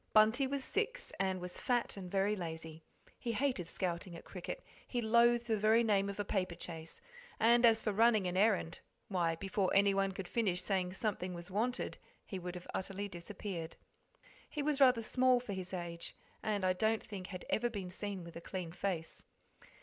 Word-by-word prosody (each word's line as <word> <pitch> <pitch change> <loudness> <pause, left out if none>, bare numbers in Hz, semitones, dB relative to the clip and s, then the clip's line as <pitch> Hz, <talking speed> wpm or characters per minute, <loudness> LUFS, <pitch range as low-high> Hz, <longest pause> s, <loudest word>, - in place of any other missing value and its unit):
Bunty 220 +5 +5
was 275 0 -2
six, - - -1
and 190 -1 +1
was 180 0 -5
fat 245 -2 +1
and 190 -3 -7
very 195 +2 +2
lazy. 160 -3 -6 0.4
He 235 - -2
hated 250 -8 0
scouting 170 0 -2
at 165 - -10
cricket, 185 - -6 0.2
he 245 - -1
loathed 235 +1 +4
the 225 -2 +1
very 220 +3 +5
name 200 -3 +3
of 200 - -6
a 205 - 0
paper 185 -3 -1
chase, 165 -2 -5 0.4
and 235 +2 +6
as 225 -1 +4
for 210 - +1
running 220 -1 +5
an 180 0 -1
errand, 190 -4 +2 0.3
why, 170 -4 +1
before 195 +2 0
anyone 195 -1 +4
could 190 -1 -6
finish 185 -5 +1
saying 185 -2 0
something 185 -3 -2
was 175 +2 -8
wanted 240 +6 -1 0.3
he 190 - -5
would 180 0 -5
have 180 - -7
utterly 195 +2 -2
disappeared. 175 -2 -6 0.7
He 295 - -3
was 290 -1 +1
rather 250 -4 +6
small 255 +2 +4
for 240 -4 -5
his 185 -1 -4
age; 170 -2 -4 0.3
and 205 -3 0
I 185 - +4
don't 220 +4 +1
think 190 -3 -7
had 180 -2 -7
ever 240 +2 +2
been 195 -5 -5
seen 195 -1 -4
with 170 0 -10
a 170 - -6
clean 180 -2 -5
face. 175 -3 -3
195 Hz, 190 wpm, -35 LUFS, 180-225 Hz, 0.7 s, and